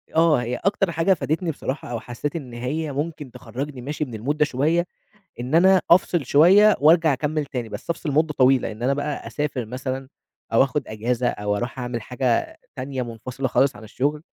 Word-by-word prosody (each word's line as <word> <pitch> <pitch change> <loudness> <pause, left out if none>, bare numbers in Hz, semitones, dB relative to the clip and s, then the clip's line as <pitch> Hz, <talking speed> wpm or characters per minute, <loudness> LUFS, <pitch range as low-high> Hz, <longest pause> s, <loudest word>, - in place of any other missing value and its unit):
آه، 160 -5 +4
هي 120 +1 -2
أكتر 195 +1 0
حاجة 165 +4 +3
فادتني 165 0 -1
بصراحة، 140 -1 -5
أو 120 - -2
حسيت 120 +6 -5
إن 135 -7 -6
هي 145 +6 -3
ممكن 145 -1 -4
تخرّجني 135 +2 -6
ماشي 150 +4 -3
من 115 -4 -8
الmood 145 +2 +1
ده 150 - +4
شوية، 155 +5 +1 0.5
إن 125 +5 -1
أنا 190 +2 +6
أفصل 175 -3 +4
شوية 190 - +6
وارجع 160 +1 +5
أكمّل 150 +2 -1
تاني، 125 -4 -5
بس - - -8
أفصل 165 -2 -2
مدة 155 +2 +2
طويلة، 130 -3 +3
إن 110 +2 -8
أنا 135 +2 +2
بقى 145 +1 -3
أسافر 140 -5 -3
مثلًا، 130 +3 -5 0.5
أو 115 - +6
آخد 135 +2 -1
أجازة، 120 +3 -1
أو 105 -3 -1
أروح 120 +4 -4
أعمل 120 -2 -3
حاجة 125 +1 -1 0.2
تانية 130 0 -4
منفصلة 125 +3 -5
خالص 135 +2 +2
عن - - -12
الشغل. 145 +7 -2
140 Hz, 190 wpm, -23 LUFS, 125-155 Hz, 0.5 s, أنا